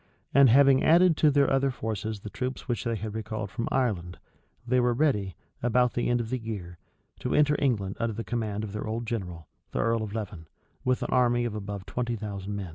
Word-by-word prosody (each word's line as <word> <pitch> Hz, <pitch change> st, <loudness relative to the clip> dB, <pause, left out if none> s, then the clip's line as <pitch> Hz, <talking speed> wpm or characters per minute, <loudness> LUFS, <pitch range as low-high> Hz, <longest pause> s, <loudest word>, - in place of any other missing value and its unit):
And 140 Hz, -1 st, +7 dB
having 135 Hz, +2 st, +6 dB
added 170 Hz, +1 st, +5 dB
to 155 Hz, -, +5 dB
their 140 Hz, -1 st, +4 dB
other 135 Hz, 0 st, +2 dB
forces 110 Hz, -3 st, -4 dB
the 105 Hz, -, -8 dB
troops 130 Hz, +1 st, -4 dB
which 120 Hz, -5 st, -2 dB
they 115 Hz, -1 st, 0 dB
had 105 Hz, 0 st, -5 dB
recalled 110 Hz, -2 st, -4 dB
from 115 Hz, 0 st, -3 dB
Ireland, 95 Hz, -9 st, -1 dB, 0.5 s
they 125 Hz, +1 st, +2 dB
were 120 Hz, -1 st, +2 dB
ready, 105 Hz, -, +1 dB, 0.3 s
about 125 Hz, +1 st, +2 dB
the 120 Hz, -, 0 dB
end 120 Hz, 0 st, +2 dB
of 115 Hz, -1 st, -4 dB
the 130 Hz, -, -1 dB
year, 95 Hz, -7 st, -6 dB, 0.4 s
to -, -, -1 dB
enter 150 Hz, 0 st, +4 dB
England, 105 Hz, -8 st, 0 dB
under 115 Hz, -1 st, -1 dB
the 115 Hz, -, -4 dB
command 110 Hz, -3 st, -2 dB
of 105 Hz, -2 st, -6 dB
their 105 Hz, -, -4 dB
old 115 Hz, +2 st, -3 dB
general, 90 Hz, -8 st, -5 dB, 0.3 s
the -, -, -1 dB
earl 115 Hz, 0 st, +1 dB
of 110 Hz, -1 st, -5 dB
Leven, 95 Hz, -7 st, -5 dB, 0.4 s
with 125 Hz, 0 st, +1 dB
an -, -, -3 dB
army 120 Hz, -1 st, +3 dB
of 115 Hz, -, -2 dB
above 100 Hz, -2 st, -5 dB
twenty 120 Hz, +4 st, -2 dB
thousand 100 Hz, -2 st, -5 dB
men. 100 Hz, -3 st, -5 dB
115 Hz, 215 wpm, -27 LUFS, 105-125 Hz, 0.5 s, And